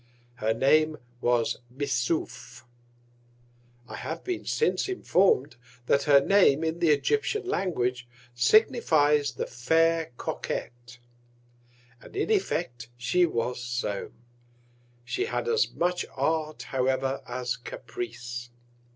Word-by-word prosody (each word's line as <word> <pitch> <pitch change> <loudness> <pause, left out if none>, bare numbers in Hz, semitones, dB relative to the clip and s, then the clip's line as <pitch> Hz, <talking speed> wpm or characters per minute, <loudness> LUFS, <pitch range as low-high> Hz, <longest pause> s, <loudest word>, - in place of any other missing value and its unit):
Her 110 0 0
Name 155 +6 +3 0.2
was 120 -1 +1
Missouf. 125 -2 -3 1.2
I - - -8
have - - -5
been 365 -1 -4
since 455 -3 +1
inform'd, 180 - +2 0.3
that 140 +2 +2
her 145 -2 +7
Name 160 -2 +4
in 160 +1 -2
the 170 -2 +3
Egyptian 425 - +1
Language 125 - -1 0.3
signifies 150 - +3
the - - -3
Fair 165 +5 +1
Coquet. - - -4 1.3
And - - -14
in 415 +2 -1
Effect, 140 - -1
she 170 +9 +2
was 125 -3 -2
so: 120 -4 -3 0.9
She 380 - -1
had 460 - -3
as 455 -1 +2
much 175 +1 -1
Art, 155 -1 -1
however, 130 +1 -1
as 125 0 -2
Caprice. 350 - -7
145 Hz, 110 wpm, -27 LUFS, 125-180 Hz, 1.3 s, her